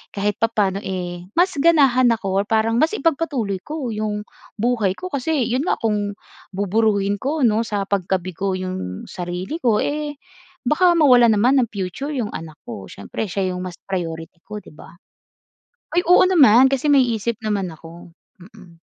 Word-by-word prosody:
kahit 205 +1 -1
papaano, 205 -4 +1
eh, 180 -2 -5
mas 365 +1 +3
ganahan 275 -6 +5
ako 195 -4 0
or - - -3
parang 225 +2 +2
mas 325 +7 +2
ipagpatuloy 275 - -1
ko 295 -4 -5
'yong 210 -1 -3 0.3
buhay 220 -4 0
ko. 365 0 -7
Kasi 280 0 0
'yon 250 +3 0
nga - - +1
kung 205 -2 -2 0.3
buburuhin 200 0 0
ko, 290 +1 -1
'no, 220 0 +3
sa 205 -3 -2
pagkabigo 185 -1 -2
'yong 185 - -5
sarili 180 - -5
ko, 225 -4 +3
eh, 295 -1 -3 0.5
baka 345 +5 +3
mawalan 245 -7 +6
naman 255 +6 +4
ng 235 - -2
future 200 - -5
'yong 225 -5 -3
anak 155 -2 -8
ko. 105 -5 -8
Siyempre 200 - -5
siya 185 0 -1
'yong 180 - -5
mas 180 -1 -7
priority 165 -3 -5
ko, 210 +1 -8
'di 205 - -11
ba? 170 +2 -15 1.0
Ay, 355 - +2
oo 360 +2 +6
naman, 265 - +6
kasi 275 +1 -1
may 275 -2 +6 0.2
isip 225 +1 -3
naman 200 -4 -2
ako. 165 +2 -13 0.2
Mm. 180 -3 -17
210 Hz, 165 wpm, -21 LUFS, 185-260 Hz, 1.0 s, mawalan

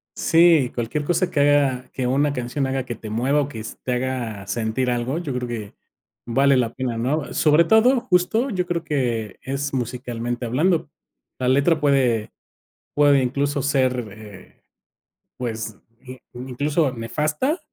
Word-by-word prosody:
Sí, 165 -6 +4
cualquier 125 +5 -2
cosa 175 +3 +1
que 150 - 0
haga, 140 -3 +2
que 130 - -2
una 140 +3 +1
canción 130 +2 -2
haga 135 0 -1
que 120 - -5
te 110 0 -9
mueva 130 +7 +1
o 140 - -2
que 115 -6 -7 0.2
te 125 - -1
haga 125 -5 -3
sentir 115 +5 -1
algo, 120 +4 -1
yo 155 -6 -4
creo 125 0 -3
que 110 -4 -6 0.5
vale 135 +3 +3
la 120 -2 0
pena, 125 -3 -3
¿no?, 140 +6 -1
sobre 150 +2 +4
todo, 220 +8 +4
justo, 205 +8 +1
yo 185 -6 -1
creo 170 -1 -2
que 120 - -2
es 140 +1 -3
musicalmente 120 -1 -3
hablando. 155 +9 +1 0.5
La 130 - -1
letra 140 +5 +3
puede 130 -7 +2 0.6
puede 145 -2 +4
incluso 140 +2 -1
ser, 130 -3 +1
eh, 100 -1 -14 0.8
pues, 115 -3 -4 0.2
i 130 0 -10 0.2
incluso, 135 +4 -1
nefasta. 150 - -1
130 Hz, 150 wpm, -22 LUFS, 120-150 Hz, 0.8 s, Sí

